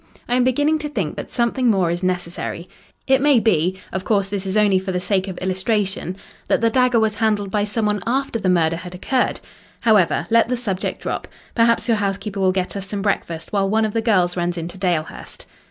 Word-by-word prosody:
I 240 - -1
am 250 0 +3
beginning 290 +5 +2
to 300 -1 -4
think 195 - -3
that - - -7
something 240 +1 +1
more 190 -6 +2
is 175 +1 -3
necessary. 180 -1 -3 0.4
It 265 0 +3
may 285 -3 +5
be 185 -4 +1
of 190 - -2
course, 200 -2 +1
this 195 -1 -3
is 190 +2 -1
only 205 -3 +4
for 190 0 -4
the 180 - -1
sake 190 +1 0
of 185 -2 -6
illustration 190 0 -1 0.3
that - - +2
the 230 +1 +2
dagger 250 -1 +3
was 220 -1 +1
handled 210 -2 0
by 205 0 +1
some 210 +1 -2
one 210 0 +1
after 260 -1 0
the 190 -3 0
murder 165 -2 +2
had 180 +1 -8
occurred. 250 +7 0 0.4
However, 215 -7 +3
let 230 0 +4
the 250 - 0
subject 200 -6 -3
drop. - - -3 0.3
Perhaps 230 0 +2
your 230 -2 +3
housekeeper 200 0 -3
will 190 -1 +3
get 185 0 -2
us 195 -1 -5
some 200 0 -4
breakfast 170 -5 -2
while 195 -1 +1
one 220 +2 +2
of 215 - -3
the 225 - +1
girls 185 -6 +2
runs 175 0 -1
into 170 +2 -5
Dalehurst." 175 -4 -3
200 Hz, 220 wpm, -21 LUFS, 185-230 Hz, 0.4 s, may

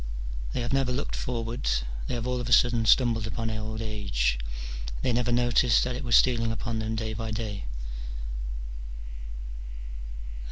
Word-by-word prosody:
They - - 0
have 120 +1 -1
never 135 -2 +3
looked 135 +3 -1
forward: 120 0 -2 0.4
they - - -1
have 120 -1 -2
all 125 0 0
of 120 - -3
a - - -3
sudden 120 -2 +5
stumbled 115 -3 +5
upon 115 0 -2
old 110 0 -3
age: 80 - +1 0.6
they 125 - +3
never 120 0 +2
noticed 120 0 +5
that 125 0 -1
it 130 - -4
was 120 -2 +4
stealing 115 -3 +5
upon 115 0 -2
them 110 0 -1
day 110 -1 -1
by 110 +1 -3
day. 105 -3 -3
115 Hz, 155 wpm, -28 LUFS, 110-120 Hz, 0.6 s, sudden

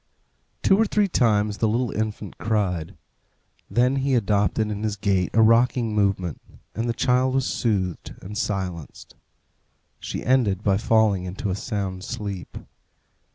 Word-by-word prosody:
Two 195 - +5
or 225 - +4
three 210 -1 +2
times 105 - +1
the 110 - +2
little 115 +2 0
infant 110 -2 -4
cried. 95 -5 -1 0.7
Then 125 +3 +2
he 135 0 +1
adopted 105 -1 +1
in 105 0 -4
his 110 -1 -1
gait 95 -3 0
a 110 - +6
rocking 115 0 +3
movement, 100 -5 0 0.3
and 115 +2 -2
the - - +1
child 130 +3 +1
was 135 -1 +1
soothed 95 -10 -2
and 105 +3 -9
silenced. 95 -7 -4 0.9
She - - -5
ended 110 -7 +2
by 100 -2 +3
falling 105 -4 +2
into 95 +2 -4
a - - -1
sound 100 -4 -4
sleep. 100 -3 -6
105 Hz, 145 wpm, -24 LUFS, 95-120 Hz, 0.9 s, a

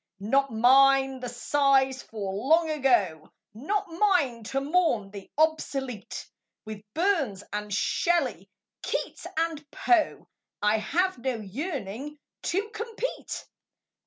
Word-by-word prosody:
Not 270 +7 +1
mine 270 +3 +5
the 250 -1 -5
sighs 270 +1 +2
for 200 -4 -5
Long 315 +10 +3
Ago; 235 - +1 0.2
Not 390 - -2
mine 330 - +1
to 270 +5 -1
mourn 275 - +1
the 200 -2 -10
obsolete; 275 -8 -1 0.4
With 215 -1 -7
Burns 315 - +1
and 210 0 -4
Shelley, 250 - 0 0.3
Keats - - -3
and 325 -2 -1
Poe 345 +1 +1 0.3
I 210 +1 +2
have 360 - 0
no 255 0 -1
yearning 265 - -5 0.3
to 400 +4 0
compete. 455 +2 -5
270 Hz, 110 wpm, -27 LUFS, 220-325 Hz, 0.4 s, mine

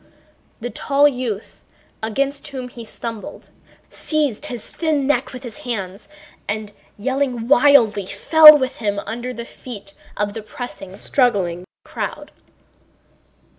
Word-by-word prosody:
The 245 +1 -4
tall 285 +1 +3
youth, 245 -7 -4 0.4
against 275 +7 -2
whom 260 -3 -6
he 240 -1 -10
stumbled, 225 -1 -8 0.4
seized 300 -8 -1
his 240 -3 -6
thin 310 -4 -1
neck 265 -2 +1
with 255 -1 -9
his 235 -4 -8
hands 200 -5 -5 0.4
and, 210 0 -3 0.3
yelling 255 0 -1
wildly, 240 -8 +5
fell 305 +10 +8
with 260 -2 -2
him 205 -3 -1
under 240 +3 -4
the 235 -1 -7
feet 205 -6 -10 0.2
of 205 0 -1
the 225 - -6
pressing, 205 -3 -8
struggling 190 -4 0 0.2
crowd. - - -5
240 Hz, 125 wpm, -20 LUFS, 205-275 Hz, 0.4 s, fell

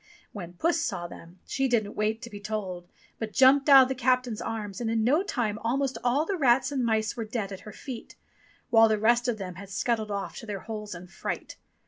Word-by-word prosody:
When 175 -4 -8
Puss 330 - +1
saw 180 - -2
them, 175 +1 -12
she 270 0 0
didn't 220 -5 0
wait 215 +3 -1
to 235 - -6
be 205 - -7
told, 195 -4 -4 0.3
but 220 -1 -4
jumped 270 +2 +5
out 270 -1 +10
of - - 0
the 265 - -1
captain's 250 -3 +1
arms, 215 -2 -4
and 230 - -1
in 225 -1 +1
no 285 +9 +4
time 240 - -2
almost 265 +4 -1
all 255 +6 +2
the 390 +2 -2
rats 265 -2 +3
and 265 -3 0
mice 220 -2 +1
were 230 - -3
dead 215 -3 -4
at 190 - -6
her - - -8
feet, 240 +3 -8 0.6
while 225 -1 +7
the 215 -1 +2
rest 240 +3 +3
of 240 -3 0
them 185 -3 -6
had 200 - -10
scuttled 220 +1 -1
off 200 -1 -4
to 225 - -9
their 200 -2 -4
holes 210 -3 -6
in 175 +1 -9
fright. 185 +1 -5
225 Hz, 225 wpm, -27 LUFS, 205-255 Hz, 0.6 s, out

